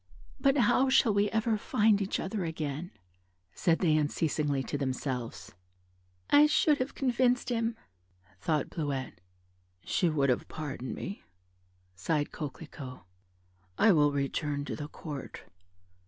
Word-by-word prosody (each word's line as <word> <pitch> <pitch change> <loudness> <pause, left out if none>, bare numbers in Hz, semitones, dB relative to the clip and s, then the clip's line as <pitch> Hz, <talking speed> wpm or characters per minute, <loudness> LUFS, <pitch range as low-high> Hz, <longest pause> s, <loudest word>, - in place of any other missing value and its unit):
"But 275 +1 +3
how 250 +2 +4
shall 260 -4 +4
we 205 +1 +2
ever 220 0 +1
find 210 0 +3
each 195 - -1
other 195 0 -3
again," 160 0 -4 0.6
said 165 -2 +2
they 160 -4 +2
unceasingly 150 -2 0
to - - -4
themselves. 130 -3 -3 0.8
"I 295 +1 +8
should 300 0 +3
have 255 +2 -3
convinced 250 -1 +1
him," 230 -1 0 0.6
thought 150 - -1
Bleuette. 140 - -4 0.6
"She 175 - +1
would 140 -4 +2
have 125 - -1
pardoned 135 -4 -5
me," 200 - -6 0.7
sighed 145 - -1
Coquelicot: 140 -3 -7 0.7
"I 220 - +6
will 145 -4 +4
return 145 +1 -2
to - - -4
the 145 - -6
Court. 150 -3 -8
160 Hz, 125 wpm, -30 LUFS, 145-220 Hz, 0.8 s, I